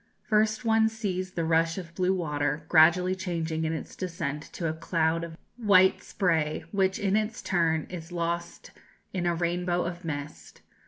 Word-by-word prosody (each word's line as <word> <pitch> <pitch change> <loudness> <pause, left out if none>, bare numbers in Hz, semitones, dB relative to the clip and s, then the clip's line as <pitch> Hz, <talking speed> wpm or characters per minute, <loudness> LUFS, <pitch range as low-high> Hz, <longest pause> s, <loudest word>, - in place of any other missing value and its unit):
"First 215 +2 +1
one 220 0 +4
sees 185 -4 -3
the 165 - -1
rush 165 +1 +2
of 170 -3 -7
blue 185 +1 +1
water, 150 -4 -1
gradually 175 +3 +5
changing 165 -4 -2
in 160 - -1
its 160 - -6
descent 165 -5 -3
to 170 - -4
a 155 - -1
cloud 165 0 0
of 165 -1 -7 0.2
white 190 -5 +5
spray, 160 -6 0
which 190 -2 +1
in 195 0 +1
its 215 +1 -1
turn 165 -4 +1
is 175 -1 -8
lost 170 0 -3 0.4
in 175 -2 -1
a 170 - +1
rainbow 175 +1 0
of 175 +1 -5
mist. 150 -2 -7
175 Hz, 165 wpm, -28 LUFS, 160-190 Hz, 0.4 s, gradually